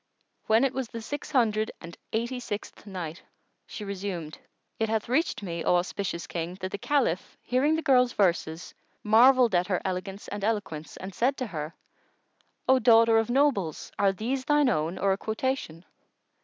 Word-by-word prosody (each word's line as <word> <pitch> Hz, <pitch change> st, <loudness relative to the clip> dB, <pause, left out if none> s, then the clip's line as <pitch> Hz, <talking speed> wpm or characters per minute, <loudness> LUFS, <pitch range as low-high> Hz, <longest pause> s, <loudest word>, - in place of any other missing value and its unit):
When 220 Hz, +3 st, +4 dB
it 270 Hz, -1 st, +1 dB
was 260 Hz, -2 st, -3 dB
the 230 Hz, -, -7 dB
Six 285 Hz, +6 st, -6 dB
Hundred 220 Hz, -5 st, +2 dB
and 170 Hz, 0 st, -10 dB, 0.2 s
Eighty 235 Hz, +3 st, -2 dB
sixth 210 Hz, -2 st, -7 dB
Night, 175 Hz, -4 st, -6 dB, 0.5 s
She 210 Hz, -, -7 dB
resumed, 185 Hz, -6 st, -5 dB, 0.4 s
It 220 Hz, -1 st, 0 dB
hath 220 Hz, -1 st, -1 dB
reached 260 Hz, -3 st, 0 dB
me, 170 Hz, -3 st, -4 dB
O -, -, +3 dB
auspicious 175 Hz, -1 st, -2 dB
King, 170 Hz, +1 st, -4 dB
that 185 Hz, 0 st, -3 dB
the 200 Hz, -, -4 dB
Caliph, 240 Hz, -, 0 dB
hearing 275 Hz, +5 st, +2 dB
the 320 Hz, -, -2 dB
girl's 250 Hz, -2 st, +4 dB
verses, 170 Hz, -4 st, 0 dB, 0.3 s
marvelled 240 Hz, +2 st, +6 dB
at 180 Hz, 0 st, +2 dB
her 185 Hz, -3 st, +1 dB
elegance 190 Hz, +2 st, -4 dB
and 205 Hz, -1 st, -5 dB
eloquence, 200 Hz, -8 st, -2 dB
and 190 Hz, +1 st, -7 dB
said 260 Hz, +8 st, +1 dB
to 255 Hz, -, -2 dB
her, 160 Hz, -6 st, -6 dB, 0.9 s
"O 260 Hz, 0 st, +5 dB
daughter 230 Hz, -1 st, +6 dB
of 225 Hz, -, -1 dB
nobles, 240 Hz, -, +1 dB
are 200 Hz, -1 st, +4 dB
these 240 Hz, +7 st, -2 dB
thine 295 Hz, -2 st, +4 dB
own 165 Hz, -3 st, -1 dB
or 195 Hz, +1 st, +2 dB
a -, -, -2 dB
quotation?" 220 Hz, -7 st, -3 dB
210 Hz, 170 wpm, -27 LUFS, 180-250 Hz, 0.9 s, marvelled